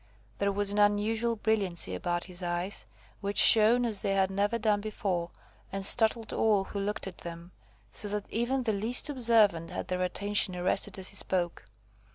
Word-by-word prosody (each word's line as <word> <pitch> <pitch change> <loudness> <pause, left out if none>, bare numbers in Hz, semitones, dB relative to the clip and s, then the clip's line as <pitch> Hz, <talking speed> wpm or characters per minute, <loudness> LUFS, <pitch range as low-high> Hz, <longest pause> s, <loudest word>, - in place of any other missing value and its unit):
There 200 0 0
was 200 0 -1
an 205 - -1
unnatural 215 +3 +1
brilliancy 200 - -1
about 175 - -3
his 180 -1 -8
eyes, 175 +2 -4 0.3
which 200 0 -4
shone 230 +3 +7
as 215 -4 -2
they 195 - -1
had 190 -1 +1
never 205 +4 0
done 210 -2 0
before, 195 -5 -3 0.4
and 195 0 -3
startled 225 +1 +3
all 210 -3 +1
who 200 - -7
looked 210 +2 -3
at 190 -2 -9
them, 170 +1 -10 0.4
so 210 - -5
that 205 0 -4
even 250 +4 -1
the 220 -3 -1
least 230 +8 +1
observant 220 - +2
had - - -6
their 180 0 -2
attention 200 +1 +2
arrested 180 +3 +1
as 190 -1 -3
he - - -9
spoke. 175 - -2
205 Hz, 180 wpm, -28 LUFS, 185-220 Hz, 0.4 s, shone